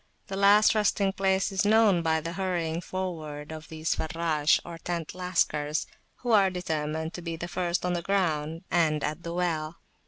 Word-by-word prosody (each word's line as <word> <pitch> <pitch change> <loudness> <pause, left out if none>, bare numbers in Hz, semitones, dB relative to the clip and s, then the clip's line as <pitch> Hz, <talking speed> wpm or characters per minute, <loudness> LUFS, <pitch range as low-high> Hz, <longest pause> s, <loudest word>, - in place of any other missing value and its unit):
The 195 - -3
last 200 +2 +6
resting 205 -2 +2
place 190 0 +1
is 190 -1 +1
known 210 -4 +4
by 160 -1 +1
the 165 +2 -5
hurrying 175 -3 -1
forward 160 -6 -5
of 155 0 -8
these 160 0 -1
Farrash, 160 -2 +1
or 170 -1 -8
tent 170 -2 -4
Lascars, 160 -4 0 0.4
who 245 - 0
are 200 -3 +5
determined 160 -3 -3
to 175 - -6
be 165 -1 -4
the 170 +2 -5
first 175 +1 -1
on 180 - 0
the 175 - -1
ground 165 -3 -1
and 155 -3 +2
at 155 +3 -2
the 170 - -5
well. 170 -2 -1
170 Hz, 180 wpm, -28 LUFS, 160-190 Hz, 0.4 s, last